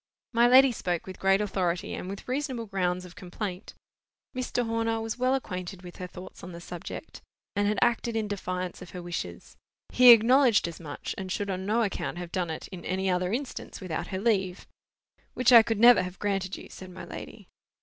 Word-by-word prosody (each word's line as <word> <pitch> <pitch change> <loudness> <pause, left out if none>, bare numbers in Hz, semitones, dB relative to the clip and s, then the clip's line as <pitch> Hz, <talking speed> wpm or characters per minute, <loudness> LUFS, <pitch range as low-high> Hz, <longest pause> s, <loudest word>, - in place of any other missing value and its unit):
My 235 +1 +5
lady 260 +2 +7
spoke 180 -6 -2
with 190 -1 -9
great 195 +1 +3
authority, 185 -4 -1
and 180 - -5
with 200 0 -8
reasonable 260 -3 -2
grounds 185 -3 -1
of 175 - -13
complaint. 185 +1 -6 0.6
Mr. 250 -1 -1
Horner 225 0 0
was 225 +2 -4
well 255 +1 +3
acquainted 185 -6 -5
with 175 -1 -10
her 180 - -5
thoughts 180 +1 -11
on 180 0 -8
the 170 - -8
subject, 175 - -8 0.3
and 205 0 +2
had 210 - 0
acted 235 0 +1
in 220 -1 0
defiance 185 -3 -4
of 180 - -9
her 180 - -7
wishes. 150 - -6 0.3
He 250 0 +7
acknowledged 240 -1 +6
as 170 - -8
much, 150 -4 -6
and 190 -1 -5
should 200 +1 -2
on 190 +1 -4
no 230 +3 +2
account 200 -4 -3
have 175 -1 -6
done 180 -3 -1
it, 160 - -5
in 180 -3 -9
any 190 +1 -1
other 180 0 0
instance, 260 +4 -5
without 180 -5 -4
her 190 - -4
leave. 190 -3 0 0.7
"Which 255 0 +4
I 230 - +11
could 225 -1 -1
never 240 -2 +8
have 180 0 -6
granted 195 -2 -2
you," - - -11
said 185 - -10
my 180 - -9
lady. - - -9
195 Hz, 200 wpm, -28 LUFS, 180-230 Hz, 0.7 s, I